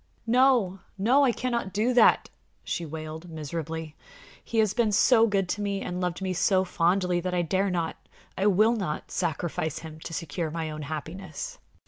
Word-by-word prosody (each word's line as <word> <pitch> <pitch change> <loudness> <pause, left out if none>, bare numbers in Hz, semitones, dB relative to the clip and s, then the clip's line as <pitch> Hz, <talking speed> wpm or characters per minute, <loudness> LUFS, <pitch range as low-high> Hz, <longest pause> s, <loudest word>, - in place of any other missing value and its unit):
"No, 240 -6 +3 0.2
no! 245 +9 +4
I 260 - +4
cannot 235 -6 -2
do 220 +5 +1
that," 245 - +5 0.4
she 170 - -3
wailed, 160 +2 -7
miserably. 160 0 -5 0.5
"He 230 - -4
has 215 -2 +3
been 230 -2 +2
so 230 +2 +5
good 195 -3 +1
to 210 - -2
me 200 -1 -1
and 180 +1 -4
loved 180 +1 -2
me 185 -1 -1
so 190 +1 +2
fondly 180 +1 +1
that 180 +1 -2
I 175 - +2
dare 190 +4 +1
not 170 -3 -2 0.4
I 195 +3 +1
will 215 +4 +4
not 180 -9 -4
sacrifice 160 -2 -2
him 160 -1 -9
to 160 - -8
secure 165 +1 -3
my 160 0 -3
own 155 0 -6
happiness!" 180 - -6
185 Hz, 175 wpm, -27 LUFS, 160-210 Hz, 0.5 s, that